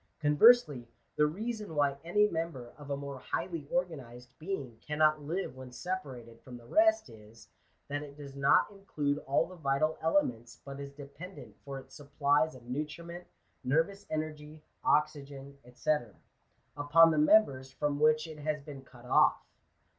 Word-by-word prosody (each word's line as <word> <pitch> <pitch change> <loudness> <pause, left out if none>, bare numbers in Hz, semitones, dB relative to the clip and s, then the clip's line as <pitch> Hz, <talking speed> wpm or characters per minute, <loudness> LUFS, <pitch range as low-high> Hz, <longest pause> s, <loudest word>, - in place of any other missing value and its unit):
Conversely, 150 - +5 0.3
the 150 - +4
reason 210 +1 -5
why 145 -1 +2
any 210 +5 +3
member 160 -9 -4
of 145 -1 -12
a 140 - -1
more 140 -1 -7
highly 145 +3 -4
organized 130 -9 -3
being 140 -10 -5
cannot 155 0 +2
live 160 -2 -3
when 130 -1 -10
separated 125 -8 -6
from 125 -2 -10
the 120 - -16
rest 330 - +3
is, 110 -1 -16 0.4
that 145 +1 -3
it 145 -1 -10
does 140 -2 -10
not 140 +8 +3
include 150 -8 -2
all 140 +4 +2
the 185 - -12
vital 155 +1 0
elements, 125 -9 0
but 140 0 -8
is 140 0 -7
dependent 145 +6 -11
for 140 -1 -6
its 135 - -12
supplies 145 +1 +1
of 125 - -13
nutriment, 160 +6 -5 0.4
nervous 165 +10 0
energy, 155 0 -5 0.2
oxygen, 140 -2 0 0.2
&c, 125 - -1 0.8
upon 155 +3 +6
the 155 - +1
members 150 -6 +4
from 145 +1 -2
which 155 +1 +4
it 155 -2 -9
has 150 +1 -2
been 140 -1 -10
cut 125 -2 -17
off. - - +3
145 Hz, 155 wpm, -31 LUFS, 135-160 Hz, 0.8 s, upon